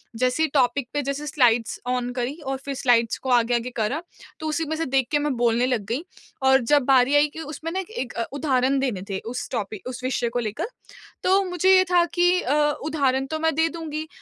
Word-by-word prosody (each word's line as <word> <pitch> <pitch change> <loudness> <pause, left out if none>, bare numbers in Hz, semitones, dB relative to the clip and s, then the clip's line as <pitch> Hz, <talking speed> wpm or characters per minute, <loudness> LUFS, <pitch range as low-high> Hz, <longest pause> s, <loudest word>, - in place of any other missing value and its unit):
जैसे 255 +6 +1
ही 315 - +1
टॉपिक 265 -1 +2
पे 290 - 0
जैसे 280 +2 -4
स्लाइड्स 245 -6 +2
ऑन 250 -1 -1
करी 250 +2 -2
और 270 0 -2
फिर 280 - -3
स्लाइड्स 235 -3 +2
को 265 - -6
आगे 245 -1 +3
आगे 240 +1 -2
करा, 235 +8 -1 0.4
तो 315 - -4
उसी 310 +1 -1
में 315 - -1
से 325 +1 -2
देख 265 -1 +1
के 295 - +3
मैं 290 -2 -1
बोलने 240 +1 +2
लग 245 -6 -1
गई। 255 +8 -2 0.4
और 265 0 +5
जब 285 +4 +3
बारी 265 +1 +4
आई 290 +1 +5
कि, 315 - -11
उसमें 315 +1 -6
ना 375 - -2
एक 380 - -6
एक 265 - -4
अ, 230 - -2
उदाहरण 265 -3 +1
देने 245 -9 -1
थे 190 - -2
उस 245 +2 -5
टॉपिक 210 -3 -4
उस 255 0 -6
विषय 245 -2 0
को 245 +1 -2
लेकर। 215 - -3 0.6
तो 385 +2 +4
मुझे 370 +1 +3
ये 370 - +6
था 350 -1 +5
कि 355 +1 +3
अ, 265 - 0 0.3
उदाहरण 275 -4 0
तो 315 - -2
मैं 320 0 +1
दे 320 +1 +3
दूँगी 315 -2 -5
270 Hz, 230 wpm, -24 LUFS, 245-315 Hz, 0.6 s, ये